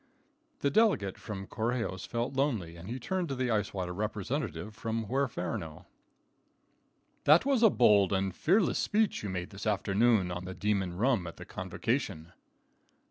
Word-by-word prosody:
The 140 - +2
delegate 190 - +2
from 95 -2 -6
Correjos 110 -4 -2
felt 120 +2 -2
lonely, 120 - -1
and 85 +4 -10
he 125 +3 -4
turned 180 +6 -2
to 135 - -2
the 125 -1 -1
Ice 105 -2 0
Water 90 -2 -3
representative 105 +3 -3
from 115 0 -3
Huerferno: 100 - -3 1.4
"That 155 - +6
was 275 -4 +2
a 225 - +8
bold 105 - +4
and 95 -1 0
fearless 190 +3 +2
speech 215 0 +1
you 105 - -4
made 90 0 -4
this 100 +2 -6
afternoon 100 -1 +2
on 90 +1 -5
the 95 +1 -6
demon 95 -4 -1
rum 115 -5 +2
at 85 - -9
the - - -9
convocation." 80 +2 -3
105 Hz, 155 wpm, -30 LUFS, 95-130 Hz, 1.4 s, a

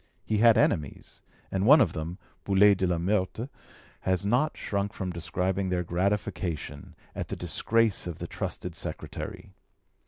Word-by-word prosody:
He 110 -1 0
had 115 0 +6
enemies, 75 -4 0 0.3
and 95 +2 0
one 150 +4 +9
of 110 - +3
them 80 +3 -4 0.3
[Boulay 100 +1 +6
de 95 -1 0
la 90 -1 +1
Meurthe.] 95 +6 0 0.5
has 95 0 0
not 125 +9 +1
shrunk 100 0 -2
from 95 -1 -4
describing 90 +3 -1
their 90 -1 0
gratification 85 -4 -2 0.2
at - - -4
the - - -4
disgrace 115 -5 +1
of 85 -3 -5
the - - -5
trusted - - -5
secretary. - - -6
95 Hz, 150 wpm, -28 LUFS, 90-105 Hz, 0.5 s, one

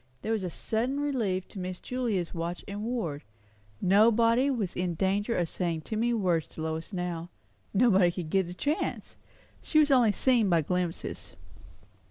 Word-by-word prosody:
There 220 - -2
was 220 -3 0
a 180 - -2
sudden 240 +10 -2
relief 225 -11 -1
to 195 - -8
Miss 185 0 -5
Julia's 230 -9 -2
watch 170 +1 -4
and 200 +1 -5
ward; 215 -12 -3 0.6
nobody 230 +6 +4
was 220 -9 -2
in 180 -1 -1
danger 200 +6 0
of 175 - +1
saying 170 -2 -2
too 220 - -5
many 235 +2 +1
words 175 -7 +1
to - - -9
Lois 160 +2 -4
now; 175 -2 -4 0.4
nobody 195 -5 +4
could 170 -3 -6
get 190 -3 +2
a - - -6
chance; 290 - -2 0.5
she 310 - -1
was 300 -2 +5
only 245 -5 +5
seen 235 -1 +2
by 170 -3 +3
glimpses. 180 +1 -3
195 Hz, 170 wpm, -29 LUFS, 175-230 Hz, 0.6 s, was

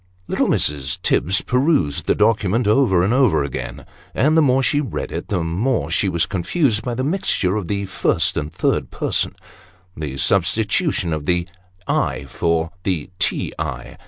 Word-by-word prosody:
Little - - 0
Mrs. 70 -2 0
Tibbs 95 +4 +2
perused 125 - +1
the - - +3
document, 105 +1 +2
over 105 -6 +3
and 100 +5 +1
over 125 - +3
again; 70 - -6 0.3
and 150 +3 +3
the 160 - +6
more 135 -2 +3
she 145 +1 +2
read 130 -9 -4
it, - - -5
the 90 -4 -1
more 95 - 0
was - - 0
she 95 - +2 0.2
confused 110 - +1
by 120 +1 -3
the 130 - -2
mixture 145 - 0
of 105 -5 -3
the 100 +1 -2
first 95 - +1
and 75 +1 -3
third 90 - 0
persons; - - 0 0.6
the 75 -4 -5
substitution 100 - +1
of 75 -2 -4
the 90 0 +1 0.3
" 90 0 -33 0.2
I" - - -7
for 85 0 -1
the 90 -3 -2
" 90 - -36
T. - - -1
I. - - -5
95 Hz, 175 wpm, -20 LUFS, 85-125 Hz, 0.6 s, the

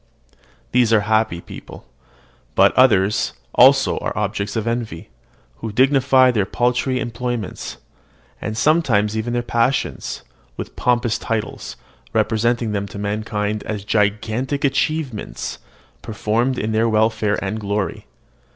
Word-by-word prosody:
These 120 -2 +3
are - - +7
certainly 110 +2 +1
happy 110 -6 +1
beings; - - -11 0.7
but - - +5
others 105 -6 +3 0.2
also - - +5
are - - -4
objects 100 0 -2
of 110 -1 -1
envy, 115 -8 -3 0.5
who 110 - -5
dignify 130 +1 +4
their 105 -5 0
paltry 125 +1 0
employments, 120 -3 -4 0.6
and 110 +1 -4
sometimes 115 -9 +2
even 110 +2 -2
their 120 0 0
passions, 120 +3 -1 0.3
with - - -7
pompous 120 -2 +1
titles, 115 -3 -4 0.4
representing 115 0 +1
them 100 -1 -2
to 100 - -9
mankind 105 0 -2
as 105 -3 -3
gigantic 110 +7 0
achievements 140 -4 -2 0.4
performed 115 +3 -1
for 115 - -2
their 110 +1 +1
welfare 110 -1 +1
and 105 +3 -3
glory. 100 -1 -3
110 Hz, 125 wpm, -20 LUFS, 105-125 Hz, 0.7 s, are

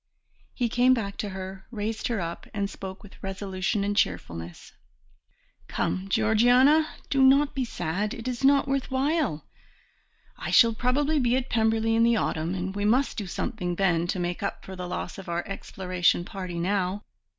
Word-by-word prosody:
He 245 - +1
came 245 +3 +4
back 200 -4 -3
to 210 - -3
her, 190 0 -7
raised 220 -1 -3
her 230 -3 -1
up, 170 -1 -5
and 200 -1 0
spoke 190 0 -8
with 205 - -15
resolution 195 +1 -2
and 205 0 -1
cheerfulness. 85 - -2 0.9
"Come, 190 +1 -2
Georgiana, 245 +8 +4 0.2
do 275 -1 +3
not 275 +2 +5
be 265 -3 -1
sad, 200 +2 -2
it 230 0 -7
is 250 0 -3
not 280 +1 +5
worth 275 -1 -1
while. 265 - 0 0.9
I - - -4
shall 230 -2 +6
probably 280 +6 +1
be 245 -1 +2
at 260 0 -4
Pemberley 225 0 +2
in 225 - +3
the 235 0 +4
autumn, 165 -4 -1
and 190 +1 -4
we 205 - -2
must 245 +7 +2
do 205 -4 -4
something 180 -1 -3
then 175 -3 +2
to 185 - -1
make 175 0 -2
up 200 - -4
for 190 - -8
the 180 -1 -5
loss 180 +2 -5
of 190 - -9
our 170 0 -2
exploration 180 -3 0
party 185 -3 -6
now. 190 +2 -1
205 Hz, 175 wpm, -26 LUFS, 185-245 Hz, 0.9 s, shall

